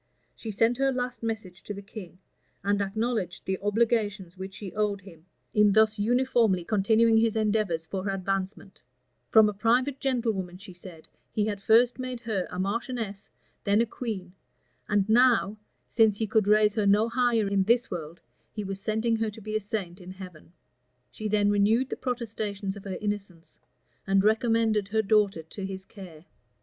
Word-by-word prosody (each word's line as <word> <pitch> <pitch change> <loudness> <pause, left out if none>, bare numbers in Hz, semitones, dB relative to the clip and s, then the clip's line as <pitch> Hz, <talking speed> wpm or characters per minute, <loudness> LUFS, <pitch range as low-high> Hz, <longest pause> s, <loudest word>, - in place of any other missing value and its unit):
She 225 - -8
sent 225 +4 +1
her 270 0 +3
last 250 -2 -3
message 210 -5 -5
to 205 - -7
the 200 - -7
king, 195 -4 -10 0.5
and 205 0 +1
acknowledged 210 -2 -2
the 190 0 -2
obligations 205 -3 0
which 190 +1 -8
she 195 -3 -7
owed 205 -1 -1
him, 170 -3 -15 0.3
in 210 -1 +4
thus 220 0 +3
uniformly 230 -4 +2
continuing 220 +3 +3
his 225 0 +2
endeavors 210 -6 0
for 190 +3 -4
her - - -1
advancement: 195 +1 -4 0.5
from 220 -1 +7
a 210 - -1
private 245 +6 +1
gentlewoman, 225 -9 -1
she 190 0 -11
said, 175 -2 -12 0.2
he 210 - 0
had 205 -2 -3
first 235 +4 +4
made 255 -1 -4
her 215 -6 -2
a - - -7
marchioness, 205 +1 -3 0.3
then 200 +1 +3
a 230 - +3
queen, 210 -6 -6 0.6
and 205 -1 +2
now, 230 -2 +4 0.3
since 220 -3 +3
he 220 - -1
could 215 -1 +1
raise 210 0 +4
her 210 -2 0
no 210 +3 +4
higher 235 -3 +1
in 200 0 +1
this 235 +3 +2
world, 165 -2 -6 0.3
he 210 - -5
was 195 0 -5
sending 220 +2 0
her 225 -1 -1
to 210 - -11
be 215 0 -5
a - - +2
saint 195 -3 -5
in 180 - -11
heaven. 185 -4 -11 0.6
She 215 - -5
then 205 -1 +2
renewed 220 +6 +2
the - - -1
protestations 215 -5 -4
of 200 - -11
her 190 -2 -4
innocence, 200 -5 -5 0.5
and 195 0 +3
recommended 220 -1 +2
her 220 +2 0
daughter 200 -5 +2
to 190 +5 -9
his 190 0 -6
care. 180 -6 -12
210 Hz, 175 wpm, -27 LUFS, 195-225 Hz, 0.6 s, from